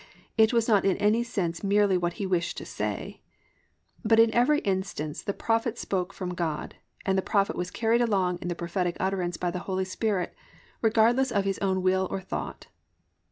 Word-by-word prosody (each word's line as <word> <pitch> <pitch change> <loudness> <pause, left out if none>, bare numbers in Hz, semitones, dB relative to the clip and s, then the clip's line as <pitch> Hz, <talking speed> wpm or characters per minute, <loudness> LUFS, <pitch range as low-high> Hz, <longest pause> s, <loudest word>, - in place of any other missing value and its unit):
it 220 0 +5
was 230 -2 +2
not 210 -4 +4
in 195 -1 +2
any 210 +3 +3
sense 185 -8 -3
merely 200 -1 +3
what 175 -1 0
he 200 - -4
wished 175 -2 -1
to - - -6
say), - - -4 0.8
but 225 0 +4
in 225 -1 +5
every 250 +5 +4
instance 190 -6 -2
the - - -2
Prophet 230 +2 0
spoke 185 -3 -2
from 185 -2 -5
God, 165 -4 -3 0.3
and 190 - +2
the - - +1
Prophet 200 0 +1
was 180 0 -3
carried 230 +3 +1
along 190 -6 +1
in 175 - -6
the 175 - -2
prophetic 175 +1 -2
utterance 185 -2 -1
by 175 -1 -1
the 180 - -4
Holy 190 0 0
Spirit, 190 0 -1 0.5
regardless 230 +4 +3
of 200 -2 +1
his 195 -1 -1
own 190 -2 0
will 190 0 +2
or - - -2
thought_. 190 - -5
195 Hz, 190 wpm, -27 LUFS, 180-220 Hz, 0.8 s, it